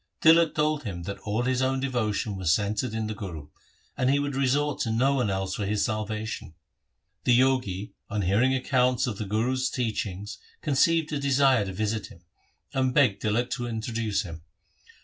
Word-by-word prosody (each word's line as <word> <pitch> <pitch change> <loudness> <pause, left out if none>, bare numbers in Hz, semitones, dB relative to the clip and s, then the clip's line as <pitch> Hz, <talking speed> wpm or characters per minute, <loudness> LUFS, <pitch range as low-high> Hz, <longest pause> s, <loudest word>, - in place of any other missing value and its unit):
Tilak 165 0 +5
told 150 -1 +1
him 90 -6 -5
that 100 +3 -5
all 110 +3 -2
his 130 0 +1
own 130 0 +1
devotion 110 -6 -1
was 90 -4 +1
centred 105 +5 0
in 110 0 -1
the 110 - -3
Guru, 85 -8 -7 0.5
and 130 - +1
he 140 - +4
would 145 0 -1
resort 140 +2 +1
to 115 - 0
no 130 +5 +2
one 125 -6 +1
else 95 -1 -2
for 105 - -3
his 105 0 +1
salvation. 110 -4 -4 0.7
The 125 -2 +4
Jogi 125 -7 +1 0.2
on 105 -1 -1
hearing 115 +9 +3
accounts 125 0 +2
of 110 -6 -4
the 105 - -3
Guru's 125 +6 0
teachings 105 -4 -3 0.2
conceived 155 +2 +2
a 145 - 0
desire 135 -5 +3
to 95 - -5
visit 110 +2 -2
him, 85 - -16 0.5
and 130 -1 +1
begged 125 -9 +3
Tilak 120 +4 0
to 120 -4 -2
introduce 110 -2 -2
him. 80 -4 -8
115 Hz, 180 wpm, -27 LUFS, 105-130 Hz, 0.7 s, Tilak